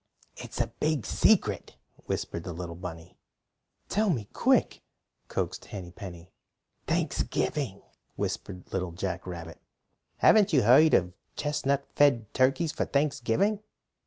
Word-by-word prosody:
"It's - - -8
a - - +3
big 155 -7 -1
secret," - - +2 0.3
whispered 85 - -3
the 90 - -5
little 85 0 -6
bunny. 85 -1 -9 0.7
"Tell 215 +1 +1
me 120 - -1
quick," - - +2 0.5
coaxed - - -3
Henny 90 -4 -8
Penny. 90 -3 -10 0.6
"Thanksgiving!" 120 -10 -1 0.3
whispered 90 -1 -4
Little 90 -3 -2
Jack 95 0 -4
Rabbit. 85 -2 -7 0.6
"Haven't 205 -4 +5
you 135 -5 +5
heard 135 +8 +7
of 90 0 +1 0.2
chestnut 140 -2 0
fed 120 -7 +3
turkeys 135 +5 +2
for - - -1
Thanksgiving?" 145 - +1
110 Hz, 120 wpm, -28 LUFS, 90-145 Hz, 0.7 s, heard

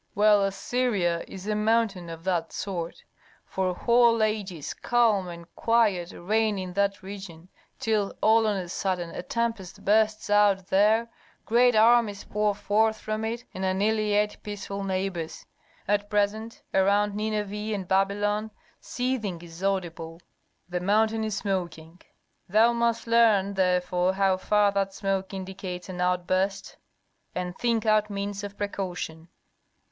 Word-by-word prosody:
"Well, 210 -1 +5
Assyria 195 -3 0
is 190 0 -9
a 210 - -1
mountain 210 -4 +1
of 165 0 -8
that 175 -3 -1
sort. 175 -4 -5 0.4
For 185 -1 -2
whole 235 0 +4
ages 200 -8 -2
calm 225 -6 +2
and 170 -1 -8
quiet 210 -7 +2
reign 215 +3 0
in 185 -1 -5
that 200 0 0
region, 190 -3 -9 0.3
till 215 -3 0
all 220 0 +4
on 210 - +1
a 180 -2 -4
sudden 180 -1 -2
a - - -5
tempest 225 -2 -3
bursts 215 +1 +2
out 205 -2 +4
there, 215 +4 +3 0.4
great 245 +1 +4
armies 220 -2 +4
pour 210 -1 0
forth 215 +2 +1
from 215 0 -3
it 230 +2 -3
and 190 - -5
annihilate 210 +2 +1
peaceful 200 -1 -5
neighbors. 185 -4 -3 0.4
At 205 0 0
present 210 +2 -1
around 200 +2 +3
Nineveh 210 0 -3
and 190 -3 -5
Babylon 205 +3 +1 0.3
seething 245 -8 -3
is 170 +1 -11
audible: 170 -4 -2 0.5
the 180 0 -2
mountain 220 +4 +2
is 215 -1 -2
smoking. 175 -4 -4 0.5
Thou 225 +5 +5
must 235 -1 0
learn 220 -4 +4
therefore 180 -1 +1
how 190 -1 +2
far 205 +1 +2
that 195 -1 -1
smoke 195 -1 -2
indicates 190 -1 -6
an 180 -1 -5
outburst, 185 +2 0 0.6
and 180 0 -3
think 230 -1 0
out 215 -1 +3
means 200 0 -4
of 205 0 -7
precaution." 180 -5 -4
200 Hz, 135 wpm, -26 LUFS, 185-215 Hz, 0.6 s, Well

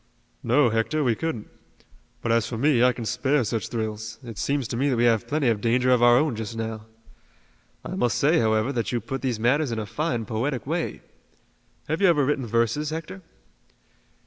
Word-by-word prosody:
"No, 125 +2 +3
Hector, 115 +8 0
we 120 -4 +2
couldn't. 125 -4 -4 0.8
But, 115 - 0
as 115 -1 +2
for 115 - -5
me, 135 0 +3
I 125 +1 +5
can 120 -2 -6
spare 130 +4 +1
such 115 0 -2
thrills. 110 -1 -4
It 115 -4 -8
seems 140 -3 -1
to - - -3
me 135 +4 +1
that 125 - 0
we 120 - +2
have 115 -3 +2
plenty 145 -2 0
of 110 -3 +1
danger 125 +3 +2
of 125 -2 +4
our 120 0 +6
own 150 -3 +1
just 110 +1 -5
now. 110 -1 -5 1.0
I - - -5
must 120 -3 0
say, 160 +4 +3
however, 110 +4 +1
that 115 -3 -2
you 120 - 0
put 135 +5 -5
these 125 -5 -2
matters 130 +4 +2
in 115 - -2
a 110 - -3
fine, 120 -1 -2
poetic 120 +3 -2
way. - - -3 0.9
Have 160 +5 -2
you 195 - +6
ever 150 -6 +3
written 135 -3 -1
verses, 115 +6 0
Hector?" 165 +4 -6
120 Hz, 200 wpm, -25 LUFS, 115-140 Hz, 1.0 s, our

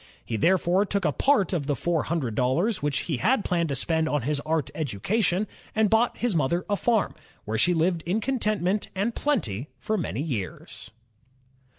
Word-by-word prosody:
He 115 - -3
therefore 180 - +3
took 200 -2 -1
a 150 - +3
part 205 - +2
of 150 -6 -1
the 145 - +1
four 165 +3 0
hundred 145 -8 -2
dollars 150 - +1
which 145 -1 0
he 155 -6 -2
had 225 - +2
planned 170 -3 0
to 140 - -1
spend 160 +4 +1
on 145 -4 0
his 145 +2 0
art 155 -2 -1
education, 175 - 0 0.3
and 220 -2 +3
bought 225 +2 +3
his 240 -5 0
mother 165 +4 +1
a 205 - +1
farm, 225 0 +1 0.3
where 110 +1 -2
she 175 0 +4
lived 165 +1 +1
in 190 +5 +1
contentment 215 -5 0
and 205 +5 0
plenty 145 - -1
for 215 -1 -2
many 140 - -3
years. 115 - -5
170 Hz, 185 wpm, -26 LUFS, 145-210 Hz, 0.3 s, she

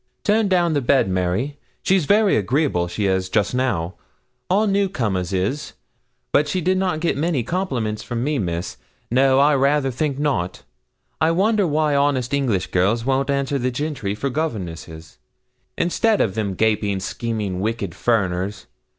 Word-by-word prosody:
'Turn 215 0 +2
down 175 -3 +2
the 145 - +1
bed, 135 -3 +3
Mary. 95 +10 -1 0.2
She's 190 -4 +2
very 205 +4 +4
agreeable 110 - +1
she 95 +4 -2
is, 95 -1 0
just 105 +2 +1
now 100 -10 0 0.6
all 200 +4 +3
new 200 -1 +1
comers 100 - -2
is; 100 +10 -2 0.6
but 150 +1 +3
she 165 +5 -1
did 185 +2 +1
not 180 -5 -1
get 170 - +1
many 150 -3 0
compliments 120 - -2
from 120 0 -3
me, 145 0 0
Miss 85 -2 -3 0.3
no, 130 +2 +4
I 145 +2 +5
rayther 140 0 +2
think 140 +2 -2
not. 140 -12 -1 0.6
I 160 - +4
wonder 200 +3 +2
why 155 -1 +1
honest 140 -2 +1
English 125 -9 0
girls 105 +6 +1
won't 135 +1 +1
answer 140 0 0
the 130 +1 0
gentry 125 -6 -3
for 135 +5 -2
governesses, 85 - -5 0.6
instead 210 +5 +2
of 95 - +1
them 105 -4 -2
gaping, 105 -2 +1
scheming, 105 -2 -3
wicked 105 -3 -2
furriners? 100 -2 -1
130 Hz, 160 wpm, -21 LUFS, 100-155 Hz, 0.6 s, I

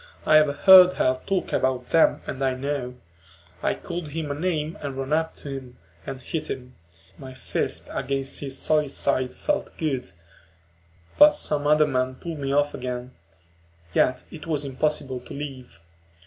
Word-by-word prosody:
I 155 - +6
have 150 -2 +3
heard 185 -1 +9
her 130 0 +1
talk 195 -2 -1
about 130 -1 0
them 165 - +3
and 135 0 -4
I 130 -1 +1
know. 130 -2 -3 0.7
I - - 0
called 175 -2 -6
him 150 0 -4
a - - 0
name 155 0 -2
and 140 -2 -5
ran 135 +2 -2
up 160 +1 0
to 145 - -9
him 130 -2 -8 0.3
and 130 - -5
hit 155 +4 -5
him; 125 -1 -6 0.5
my 130 -1 -9
fist - - -3
against 135 0 -2
his 135 -1 -4
solid 150 -2 +1
side 130 -2 0
felt 300 - -3
good, 135 - -2 1.1
but 295 0 +8
some 145 - -1
other 150 0 +5
men 130 -2 -1
pulled 165 +2 -7
me 135 -1 -2
off 145 +1 +2
again. 125 0 -5 0.8
Yet 125 0 +2
it 165 +1 -10
was 150 -3 -1
impossible 140 -1 -1
to 125 - -11
leave. 130 -10 -8
140 Hz, 165 wpm, -25 LUFS, 130-155 Hz, 1.1 s, heard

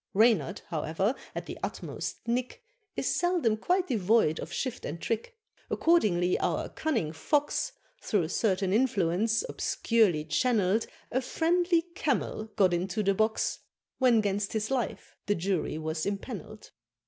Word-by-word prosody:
Reynard, 225 +1 +3
however, 165 - 0 0.2
at - - -4
the - - -7
utmost - - -5
nick, 245 - -2 0.3
Is - - 0
seldom 350 -11 +2
quite 360 - +1
devoid 215 - +2
of - - -6
shift 255 -2 -3
and 165 - -5
trick; 230 - -3 0.3
Accordingly 190 - +3
our - - -1
cunning 230 - -1
Fox, 290 - 0 0.3
Through 180 -7 0
certain 190 -2 +1
influence, 215 -2 +2
obscurely 210 - +1
channel'd 210 +4 +2 0.2
A 260 - +1
friendly 340 +4 +2
Camel 270 -9 -1
got 190 -4 +4
into 180 +4 -1
the 195 0 +3
box, 220 +2 0 0.4
When 245 -4 +5
'gainst 200 0 -1
his 215 +2 -1
life 250 -5 -2
the 205 - +2
Jury 180 -3 -1
was 155 0 -3
impanel'd. 210 +1 -6
215 Hz, 135 wpm, -29 LUFS, 185-255 Hz, 0.4 s, When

